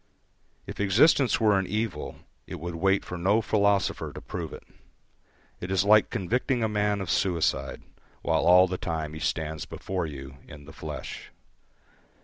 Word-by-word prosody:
If - - -8
existence 120 - +4
were 105 -4 +4
an 95 - -2
evil, 110 +3 -3 0.3
it - - -7
would 85 +2 -5
wait 95 +4 +1
for 90 - -6
no 100 +5 +3
philosopher 100 -2 +1
to - - -8
prove - - -6
it. - - -10 1.0
It 90 - -6
is 95 0 +1
like 105 +1 +5
convicting 120 +5 -1
a - - +2
man 105 -1 0
of 95 - -3
suicide, 80 -7 0 0.4
while 80 -1 +2
all 90 +2 +7
the 90 0 -4
time 80 -3 -3
he 80 - -7
stands 80 -1 -2
before 90 -3 -4
you 70 -2 -9
in 70 - -12
the - - -12
flesh. - - -7
95 Hz, 160 wpm, -27 LUFS, 80-105 Hz, 1.0 s, all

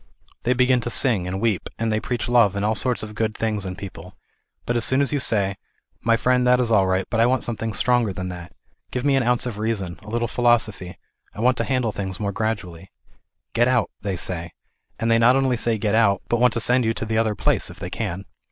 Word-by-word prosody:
They 125 - +1
begin 125 0 +3
to 120 - -3
sing 110 -8 +2
and 95 +1 -3
weep, 110 -4 -1
and 115 0 -1
they 110 - +1
preach 120 +2 -3
love 120 -5 +4
and 100 +1 -1
all 110 - +2
sorts 125 +1 0
of 105 0 -7
good 110 0 -2
things 105 -3 -1
in 90 - -5
life, 90 -1 -9 0.5
but 120 - -1
as 120 - +1
soon 130 +4 +2
as 140 +1 +1
you 145 - +1
say 100 -6 0 0.2
" - - -45
My 115 +1 +3
friend, 125 +1 +2
that 125 0 +5
is 120 -2 0
all 100 -3 +4
right, 95 0 0
but 115 - 0
I 115 - +5
want 130 +1 +1
something 115 -1 -3
stronger 120 0 +1
than 95 0 -5
that; 90 -1 -8 0.4
give 125 +1 -3
me 140 -1 +3
an 135 - +3
ounce 125 0 +1
of 115 -4 -5
reason, 105 -5 -2
a 105 - -11
little 120 +1 -1
philosophy; 110 -6 +1 0.4
I - - -9
want 125 +2 +3
to - - -1
handle 125 -4 0
things 95 -2 -5
more 100 -2 -1
gradually." 95 -5 -4 0.3
" - - -56
Get 120 +1 +3
out,'r 125 -2 +2
they 100 -1 -2
say, 85 -1 -2 0.4
and 115 0 0
they 115 - +4
not 120 +2 +5
only 135 -2 +2
say 115 -1 0
get 105 0 -1
out, 100 -4 +3
but 120 - +1
want 125 -1 +4
to - - 0
send 125 +2 +2
you 115 0 0
to 115 - -3
the 110 +1 0
other 110 -2 +1
place, - - 0
if - - -11
they - - -6
can. 95 +4 -4
115 Hz, 255 wpm, -23 LUFS, 100-120 Hz, 0.5 s, that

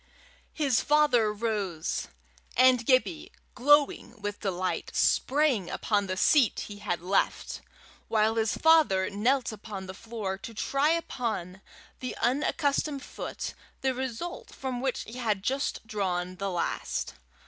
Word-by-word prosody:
His 275 -7 +2
father 290 -8 +4
rose, 205 -7 -2 0.5
and 255 -2 +5
Gibbie, 310 +7 +2 0.2
glowing 285 -3 +3
with 205 0 -4
delight, 185 -2 -2
sprang 270 - +2
upon 205 -2 0
the 185 0 -2
seat 260 +2 +4
he 205 -1 -8
had 175 -4 -3
left, 195 +2 0 0.5
while 220 0 +2
his 225 -1 0
father 300 -14 +4
knelt 240 +5 +1
upon 205 -2 -7
the 185 - -7
floor 205 -2 -5
to 225 +3 -9
try 275 +7 +1
upon 225 - -2 0.4
the 255 - -5
unaccustomed 285 +2 0
foot - - -6 0.3
the 265 -1 +1
result 260 +7 -5
from 255 -2 -4
which 265 -1 -1
he 235 +3 -9
had 210 -5 0
just 270 0 -1
drawn 185 -4 -2
the 195 +1 -2
last. 175 -2 -2
230 Hz, 130 wpm, -28 LUFS, 200-270 Hz, 0.5 s, and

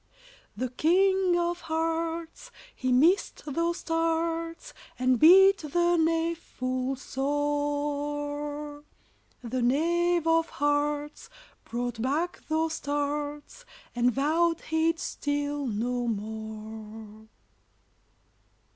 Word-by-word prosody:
The 255 +2 -2
King 370 +4 +3
of 345 0 -1
Hearts, 325 0 -3 0.3
He 255 -1 -1
missed 325 +10 +3
those 335 +4 -1
tarts, 330 +4 -1 0.2
And 255 -1 +2
beat 385 +5 +8
the 345 +3 +1
knave 330 0 +1
full 255 -2 -3
sore; 290 +1 -2 0.6
The 250 +2 -2
Knave 340 +6 +2
of 330 0 +2
Hearts 290 +5 -1 0.4
Brought 240 -1 -3
back 305 +8 -1
those 320 +1 0
tarts, 290 +7 -3 0.3
And 245 +1 +3
vowed 320 +6 +1
he'd 320 +1 +1
steal 290 -2 -2
no 240 +2 -1
more. 220 0 -7
295 Hz, 90 wpm, -28 LUFS, 255-330 Hz, 0.6 s, beat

